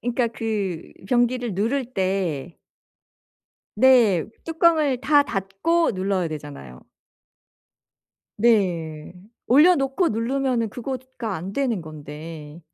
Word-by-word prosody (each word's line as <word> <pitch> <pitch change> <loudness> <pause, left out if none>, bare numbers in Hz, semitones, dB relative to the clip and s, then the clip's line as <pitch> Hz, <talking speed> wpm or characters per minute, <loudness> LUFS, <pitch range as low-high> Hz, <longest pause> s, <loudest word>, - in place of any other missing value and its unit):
그러니까 240 0 0
그 210 -7 -4 0.2
변기를 245 -2 +1
누를 245 +6 -1
때 185 - -2 1.2
네. 235 -10 +5 0.2
뚜껑을 315 -5 +2
다 290 0 +4
닫고 225 - 0
눌러야 185 -2 -1
되잖아요. 145 - -9 1.6
네. 175 -9 +1 0.3
올려놓고 290 +3 +4
누르면은 240 +1 0
그거가 250 -1 -6
안 180 +4 -6
되는 245 -5 -1
건데. 155 0 -9
225 Hz, 200 characters per minute, -23 LUFS, 175-260 Hz, 1.6 s, 네